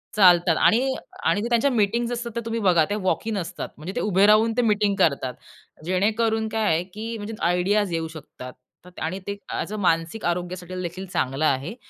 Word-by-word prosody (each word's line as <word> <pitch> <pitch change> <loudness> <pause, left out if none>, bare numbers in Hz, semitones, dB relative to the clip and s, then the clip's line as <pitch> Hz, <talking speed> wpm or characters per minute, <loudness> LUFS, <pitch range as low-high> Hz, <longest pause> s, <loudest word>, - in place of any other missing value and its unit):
चालतात 175 -4 +5
आणि 260 +4 +3 0.3
आणि 205 - +2
त्यांच्या 240 +4 +3
मीटिंग्ज 235 +2 +1
असतात 235 0 -4
तर 235 - -1
तुम्ही 230 0 -2
बघा 175 -5 +4
ते 205 - 0
वॉकइन 210 +3 -1
असतात, 175 - -5
म्हणजे 170 +6 -7
ते - - -1
उभे 195 -1 +3
राहून 220 +2 +5
ते - - +4
मीटिंग 210 -3 +2
करतात. 140 -7 +1 0.5
जेणेकरून 220 +4 +1
काय 220 0 -1
आहे 165 +2 0
की 225 +2 -5
म्हणजे 210 +2 -6 0.2
आयडियाज 190 +1 +1
येऊ 165 0 -1
शकतात 130 +2 -12
आणि 175 +4 -3
ते 200 0 -3 0.2
ॲजं 215 - -3
अ, 215 - -4
मानसिक 165 +3 0
आरोग्यासाठी 180 +1 -3
देखील 180 +2 -5
चांगलं 135 -2 -1
आहे. 140 - 0
195 Hz, 180 wpm, -24 LUFS, 175-220 Hz, 0.5 s, चालतात